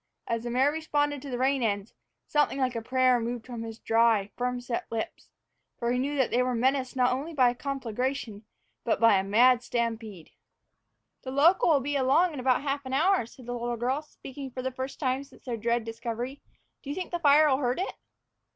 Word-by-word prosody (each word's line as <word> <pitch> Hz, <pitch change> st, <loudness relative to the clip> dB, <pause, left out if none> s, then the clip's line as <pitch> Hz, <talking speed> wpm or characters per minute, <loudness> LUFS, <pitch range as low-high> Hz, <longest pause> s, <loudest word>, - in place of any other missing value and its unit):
As 230 Hz, -1 st, -1 dB
the 240 Hz, -, -4 dB
mare 260 Hz, +4 st, +3 dB
responded 290 Hz, -2 st, -1 dB
to 280 Hz, -, -8 dB
the 245 Hz, -, -3 dB
rein 265 Hz, +1 st, +1 dB
ends, 205 Hz, -2 st, -1 dB, 0.3 s
something 295 Hz, -2 st, +1 dB
like 255 Hz, -2 st, 0 dB
a 230 Hz, -, -2 dB
prayer 255 Hz, +1 st, +3 dB
moved 235 Hz, 0 st, -4 dB
his 230 Hz, -3 st, -7 dB
dry, 225 Hz, -3 st, +2 dB
firm 250 Hz, 0 st, -2 dB
set 245 Hz, -1 st, -4 dB
lips. 225 Hz, -1 st, -5 dB, 0.5 s
For 235 Hz, 0 st, -1 dB
he 250 Hz, -, +1 dB
knew 285 Hz, +3 st, -1 dB
that 265 Hz, -3 st, +1 dB
they 245 Hz, -, +3 dB
were 250 Hz, -1 st, 0 dB
menaced 260 Hz, +2 st, 0 dB
not 250 Hz, -1 st, +3 dB
only 300 Hz, +6 st, -4 dB
by 250 Hz, -3 st, +5 dB
a -, -, -6 dB
conflagration, 250 Hz, -4 st, -3 dB, 0.4 s
but 230 Hz, -, 0 dB
by 230 Hz, -4 st, +5 dB
a -, -, -1 dB
mad 235 Hz, +5 st, +4 dB
stampede. 225 Hz, -7 st, -4 dB, 0.9 s
"The 260 Hz, -, -7 dB
local'll 295 Hz, +1 st, +4 dB
be 290 Hz, +2 st, -2 dB
along 280 Hz, +6 st, +3 dB
in 285 Hz, -, -6 dB
about 255 Hz, +1 st, +2 dB
half 280 Hz, 0 st, -2 dB
an 260 Hz, -, -5 dB
hour," 325 Hz, -, +2 dB
said 250 Hz, +1 st, -15 dB
the 245 Hz, -, -4 dB
little 240 Hz, 0 st, -3 dB
girl, 255 Hz, +5 st, -1 dB
speaking 275 Hz, -2 st, -9 dB
for 255 Hz, 0 st, -6 dB
the 260 Hz, -, -2 dB
first 260 Hz, +1 st, -6 dB
time 265 Hz, -1 st, 0 dB
since 275 Hz, -1 st, -19 dB
their 245 Hz, -3 st, -2 dB
dread 235 Hz, +1 st, -1 dB
discovery. 230 Hz, +4 st, -5 dB, 0.4 s
"Do 275 Hz, -, -9 dB
you 290 Hz, -, -3 dB
think 370 Hz, -1 st, -5 dB
the 345 Hz, -, -2 dB
fire'll 295 Hz, -3 st, +5 dB
hurt 250 Hz, -2 st, 0 dB
it?" 375 Hz, -, -2 dB
255 Hz, 205 wpm, -28 LUFS, 235-275 Hz, 0.9 s, by